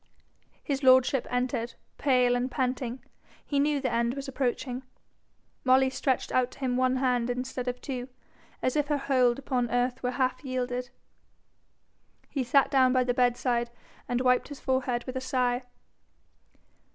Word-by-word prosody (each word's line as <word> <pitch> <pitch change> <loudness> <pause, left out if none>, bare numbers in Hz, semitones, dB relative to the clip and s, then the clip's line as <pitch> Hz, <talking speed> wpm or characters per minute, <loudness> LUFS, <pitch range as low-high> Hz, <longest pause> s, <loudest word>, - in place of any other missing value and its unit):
His 275 -1 -2
lordship 260 0 +4
entered, 245 -1 -2 0.2
pale 250 -3 +3
and 245 +1 -1
panting. 255 -1 -2 0.4
He 285 - 0
knew 290 0 +2
the 260 -3 -1
end 235 +2 +1
was 275 0 -6
approaching. 255 -1 -2 0.8
Molly 260 0 +4
stretched 260 -1 -1
out 255 -1 +2
to - - -16
him 255 -2 0
one 255 0 +2
hand 250 -2 +1
instead 250 0 -3
of 250 0 -2
two, 255 -3 -5 0.6
as 255 - +1
if 295 -1 +1
her 295 0 +1
hold 255 -3 +2
upon 250 -3 -1
earth 245 +1 0
were 250 - 0
half 255 +1 0
yielded. 250 -1 -3 1.4
He 275 - -1
sat 275 +3 +3
down 260 -2 +4
by 255 -1 +3
the 245 0 0
bedside, 245 -1 +1 0.4
and 245 0 0
wiped 250 -1 +3
his 290 -1 -9
forehead 255 -2 -1
with 255 - -7
a - - -3
sigh. 250 -1 0
255 Hz, 155 wpm, -28 LUFS, 245-265 Hz, 1.4 s, lordship